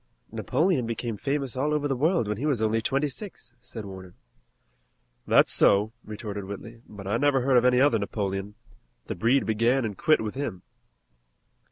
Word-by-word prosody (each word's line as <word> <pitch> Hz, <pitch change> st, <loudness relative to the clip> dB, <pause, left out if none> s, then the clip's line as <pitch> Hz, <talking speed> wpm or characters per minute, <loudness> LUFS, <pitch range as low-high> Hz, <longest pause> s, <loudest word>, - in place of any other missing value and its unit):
"Napoleon 150 Hz, -3 st, 0 dB
became 115 Hz, 0 st, -3 dB
famous 135 Hz, +1 st, -2 dB
all 150 Hz, +4 st, 0 dB
over 145 Hz, -1 st, 0 dB
the 135 Hz, -, 0 dB
world 155 Hz, -, +1 dB
when 105 Hz, 0 st, -2 dB
he 140 Hz, +7 st, -2 dB
was 140 Hz, -6 st, +1 dB
only 110 Hz, +1 st, +1 dB
twenty 140 Hz, +5 st, 0 dB
six," 140 Hz, -, -9 dB
said 110 Hz, -3 st, -8 dB
Warner. 95 Hz, -2 st, -10 dB, 1.1 s
"That's -, -, +5 dB
so," 105 Hz, +3 st, +4 dB
retorted 105 Hz, -2 st, -6 dB
Whitley, 115 Hz, +4 st, -9 dB
"but 100 Hz, -2 st, -10 dB
I 105 Hz, +4 st, 0 dB
never 140 Hz, 0 st, +2 dB
heard 130 Hz, +1 st, +2 dB
of 120 Hz, -, +3 dB
any 125 Hz, 0 st, +4 dB
other 130 Hz, -5 st, +4 dB
Napoleon. 100 Hz, 0 st, -3 dB, 0.5 s
The -, -, -4 dB
breed 120 Hz, +9 st, +2 dB
began 115 Hz, +4 st, +2 dB
and 105 Hz, -2 st, -4 dB
quit 155 Hz, -, +3 dB
with 110 Hz, -1 st, -4 dB
him." 120 Hz, -10 st, -5 dB
115 Hz, 175 wpm, -26 LUFS, 105-135 Hz, 1.1 s, That's